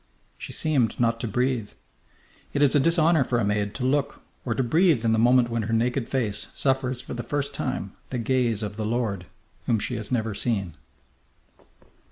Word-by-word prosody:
She - - -7
seemed 135 -8 0
not 115 -1 +2
to 115 - -3
breathe. 125 0 -1 0.8
It 145 - +2
is 140 - +5
a 145 - +5
dishonour 165 0 +4
for 125 -1 -1
a 115 - +1
maid 105 0 -1
to 125 - -3
look 140 +2 0 0.2
or 115 -3 -1
to 130 - +1
breathe 155 -1 +3
in 115 - +3
the 110 - +2
moment 120 +1 +4
when 115 0 0
her 110 +1 -3
naked 120 +2 0
face 110 -6 -1
suffers 130 -2 0
for - - -8
the 120 - -4
first 140 +4 -3
time - - -3 0.2
the 130 - -3
gaze 120 -3 +1
of 105 0 -5
the 110 - -2
lord 110 -6 -2 0.4
whom 115 - +3
she 105 - -3
has 110 +2 -6
never 110 -3 0
seen. 100 -5 -1
120 Hz, 195 wpm, -25 LUFS, 110-130 Hz, 0.8 s, is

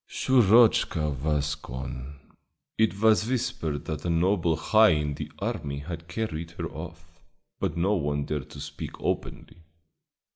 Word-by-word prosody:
"Shurochka 110 - +4
was 75 0 0
gone. 65 0 -7 0.6
It 110 -3 +1
was 110 -1 +4
whispered 120 - -2
that 80 -2 -4
a 90 - -2
noble 85 0 +2
high 110 +3 +5
in 75 -1 -1
the - - -6
army 70 -1 -3
had 80 +3 -7
carried 85 -5 -3
her 85 - -3
off, 85 +1 -10 0.4
but - - -2
no 95 +5 +2
one 75 -5 -1
dared 75 -4 -4
to - - -10
speak - - -7
openly. 85 - -4
85 Hz, 140 wpm, -27 LUFS, 75-105 Hz, 0.6 s, high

